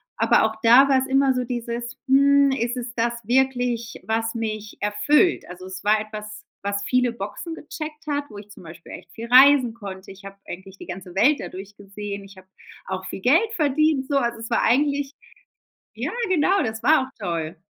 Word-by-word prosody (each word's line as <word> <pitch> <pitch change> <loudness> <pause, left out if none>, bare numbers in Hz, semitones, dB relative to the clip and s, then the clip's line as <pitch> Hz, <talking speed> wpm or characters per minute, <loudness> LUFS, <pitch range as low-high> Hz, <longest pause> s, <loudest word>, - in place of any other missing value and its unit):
Aber - - +3
auch 220 0 -2
da 245 +4 +7
war's 265 -1 +3
immer 270 0 +3
so 250 0 -1
dieses: 240 0 -5
„Hm, 280 +1 +5
ist 245 -1 -2
es 240 -1 -5
das 235 0 -1
wirklich, 245 -2 0
was 225 +1 -1
mich 215 -2 -5
erfüllt?“ 210 - +2
Also, 180 +1 -10
es 185 0 -8
war 215 +1 +3
etwas, 215 0 -8 0.2
was 200 0 -2
viele 250 -1 +2
Boxen 235 - -6
gecheckt 305 0 -8
hat, 290 -1 -1
wo 210 - -11
ich 205 0 -11
zum 205 -2 -14
Beispiel 170 +1 -12
echt 165 - -11
viel 230 +5 -8
reisen 255 -1 +6
konnte. 195 -4 -9
Ich 195 +1 -15
hab 195 0 -11
eigentlich 190 +2 -9
die - - -11
ganze 180 -1 -8
Welt 270 +9 +4
dadurch 195 +2 -9
gesehen. 200 0 -7
Ich 195 0 -15
hab 185 - -15 0.4
auch 190 0 -5
viel 190 - -6
Geld 335 - +3
verdient 300 -3 +1
so. 280 - +1 0.2
Es 225 - -7
war - - +1
eigentlich 280 +2 +1 0.8
ja, - - -3 0.2
genau, 370 +2 +2
das 220 -2 -4
war 310 -2 +5
auch 265 - -18
toll. 170 -5 -4
235 Hz, 190 wpm, -23 LUFS, 205-270 Hz, 0.8 s, da